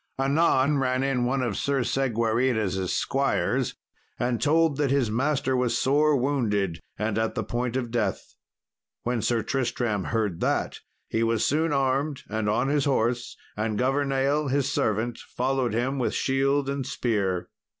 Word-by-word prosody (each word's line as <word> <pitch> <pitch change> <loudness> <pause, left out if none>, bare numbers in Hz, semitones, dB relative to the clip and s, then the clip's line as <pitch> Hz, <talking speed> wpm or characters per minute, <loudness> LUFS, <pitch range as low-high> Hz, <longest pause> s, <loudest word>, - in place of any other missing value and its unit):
Anon 140 0 +3
ran 130 0 +1
in 135 -3 +1
one 130 +1 0
of 115 -5 -1
Sir 140 +2 0
Segwarides' 115 -6 0
squires, - - 0 0.4
and 120 -1 -1
told 160 -1 +3
that 145 -2 +1
his 130 -5 +1
master 135 +2 0
was 125 -2 +1
sore 150 +4 +3
wounded, 110 - 0 0.2
and 105 +1 -1
at 110 0 -1
the 110 - -1
point 120 +3 -2
of 120 -3 -2
death. 110 -6 -2 0.7
When 120 -1 -1
Sir 115 -1 +1
Tristram 120 -5 -1
heard 105 -7 -1
that, - - -1 0.3
he 115 - -1
was 115 -1 +1
soon 160 +3 +1
armed 140 +1 0
and 110 0 -1
on 110 - +1
his 145 0 +1
horse, 120 -3 0 0.2
and 105 0 -1
Governale, 135 +3 +1
his 140 0 +1
servant, 110 +3 0
followed 130 -2 -1
him 130 +4 0
with 125 - 0
shield 135 +1 +1
and 140 0 -2
spear. 100 -8 -1
125 Hz, 150 wpm, -26 LUFS, 110-135 Hz, 0.7 s, Anon